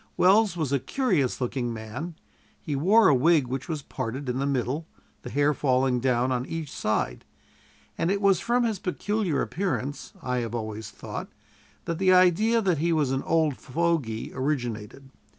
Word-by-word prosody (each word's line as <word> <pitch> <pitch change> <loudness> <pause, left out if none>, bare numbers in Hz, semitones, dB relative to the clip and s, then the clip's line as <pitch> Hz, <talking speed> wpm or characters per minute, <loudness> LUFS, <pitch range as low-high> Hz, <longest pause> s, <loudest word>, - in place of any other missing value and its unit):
Welles 195 0 +4
was 155 -5 -1
a 140 - +2
curious 175 - 0
looking 125 -1 -2
man: 115 +10 -6 0.4
he 145 - -4
wore 200 +11 +5
a - - +6
wig 150 +2 +4
which 130 +5 -5
was 155 -4 -3
parted 130 +4 -5
in 125 +1 -1
the 140 - 0
middle, 140 +4 -1 0.3
the - - -7
hair 145 +1 +2
falling 130 -2 +1
down 125 0 +1
on 125 -1 0
each 160 -3 -5
side; 110 0 -1 0.8
and 165 - +1
it 200 +1 +1
was 195 -3 +4
from 240 +4 +1
his 220 -5 -1
peculiar 190 -3 -1
appearance, 150 -7 -3
I 125 -6 -2
have 115 -1 -3
always 110 -1 -5
thought, - - -7 0.6
that 170 0 -3
the 190 -1 +4
idea 210 +6 +4
that 180 -6 +1
he 170 +2 +1
was 150 -5 +1
an 135 0 0
old 160 -4 +1
fogy 145 -7 -1
originated. 130 -2 -3
145 Hz, 170 wpm, -26 LUFS, 125-175 Hz, 0.8 s, a